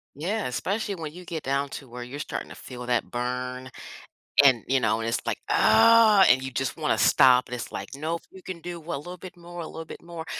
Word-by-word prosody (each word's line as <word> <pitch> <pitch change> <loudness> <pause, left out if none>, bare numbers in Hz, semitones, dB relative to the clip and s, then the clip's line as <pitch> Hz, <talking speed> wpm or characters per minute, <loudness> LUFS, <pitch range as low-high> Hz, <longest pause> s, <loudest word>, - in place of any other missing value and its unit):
Yeah, 195 +9 -2
especially 200 - -2
when 160 -4 -6
you 180 0 -10
get 165 -3 -5
down 140 +1 -1
to 135 - -8
where 120 +1 -8
you're 125 +4 -7
starting 150 - -5
to - - -8
feel 125 -1 -9
that 120 -1 0
burn 125 +1 -4 0.7
and, 130 -5 +5
you 135 0 +3
know, 110 -2 +1
and 115 - -3
it's, 115 - -1
like, - - 0
"Oh," 225 -3 +6
and 130 +2 +5
you 130 - -4
just 130 +1 -3
wanna - - 0
stop, 125 -1 +5
and 125 - -8
it's, 120 - -5
like, - - -6
"Nope, 160 +4 -3
you 190 - -13
can 180 -2 -7
do 175 0 -7
a - - -1
little 175 +6 -8
bit 180 +1 -11
more, 175 0 -9
a 160 - -6
little 165 0 -8
bit - - -10
more," 170 -1 -8
145 Hz, 235 wpm, -26 LUFS, 125-175 Hz, 0.7 s, Oh